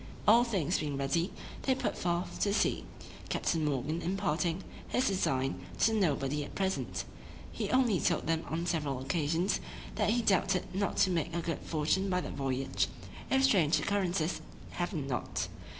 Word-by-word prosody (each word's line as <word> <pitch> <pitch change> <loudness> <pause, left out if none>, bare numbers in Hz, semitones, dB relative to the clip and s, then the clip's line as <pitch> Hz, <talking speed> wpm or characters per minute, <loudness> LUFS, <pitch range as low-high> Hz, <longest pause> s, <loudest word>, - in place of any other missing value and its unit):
All 230 +3 +8
things 190 - 0
being 145 -3 -2
ready, 150 +7 0 0.3
they 265 - +2
put 265 - -1
forth 175 0 -2
to 200 0 +2
sea, - - +1 0.4
Captain 165 -2 0
Morgan 150 +3 -1
imparting 175 -1 0 0.2
his 255 - +1
design 130 - 0
to 225 - +4
nobody 150 -7 +1
at - - -9
present; 190 -1 -1 0.5
he - - -3
only 245 -8 +3
told - - +1
them 165 0 +1
on 165 +2 -1
several 150 -6 -1
occasions, 160 +6 0 0.3
that - - +1
he 235 +2 +2
doubted 190 -2 +2
not 200 +1 -1
to 190 - +4
make 170 -1 -1
a 170 - 0
good 165 0 -2
fortune 165 +5 0
by 180 -1 +2
that - - -5
voyage, 135 -1 0 0.4
if 265 0 +3
strange 180 - +4
occurrences 185 -4 0 0.3
happened 175 -5 -2
not. 125 -3 -2
170 Hz, 160 wpm, -32 LUFS, 150-195 Hz, 0.5 s, All